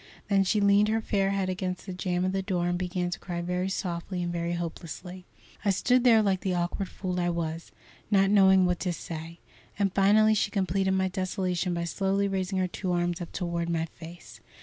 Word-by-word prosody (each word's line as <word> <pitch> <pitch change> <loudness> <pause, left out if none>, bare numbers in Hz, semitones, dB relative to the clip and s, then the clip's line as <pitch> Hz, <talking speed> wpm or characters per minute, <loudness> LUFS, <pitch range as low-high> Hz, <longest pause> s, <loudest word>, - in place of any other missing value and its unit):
Then 195 -1 +4
she 210 +3 +2
leaned 200 +1 +4
her 220 +1 +1
fair 200 -3 0
head 195 -1 0
against 185 -1 -3
the 190 - -5
jam 180 0 -1
of 185 - 0
the 195 0 -1
door 180 -2 -1
and 175 - 0
began 180 -1 -2
to - - -4
cry 175 -2 -5
very 180 +2 -1
softly 180 -1 -3
and 175 0 -3
very 170 0 -2
hopelessly. 175 +2 -6 0.4
I 205 - +1
stood 245 +6 +3
there 225 -3 +6
like 195 -2 +1
the 185 -2 -1
awkward 175 +2 -2
fool 180 -2 -3
I 175 0 +1
was, 165 -1 -3 0.4
not 195 -1 +4
knowing 190 -2 +6
what 180 -1 0
to 180 -2 -1
say; 165 0 -7 0.4
and 200 -2 +1
finally 215 +2 +5
she 205 - +1
completed 190 -1 0
my 190 0 +2
desolation 185 -1 -1
by 170 - -2
slowly 195 +3 0
raising 190 -1 -2
her 185 -1 +1
two 180 +1 -4
arms 175 0 0
up 170 - -6
toward 170 -2 -2
my 165 -1 0
face. 165 +1 -12
185 Hz, 210 wpm, -28 LUFS, 175-195 Hz, 0.4 s, there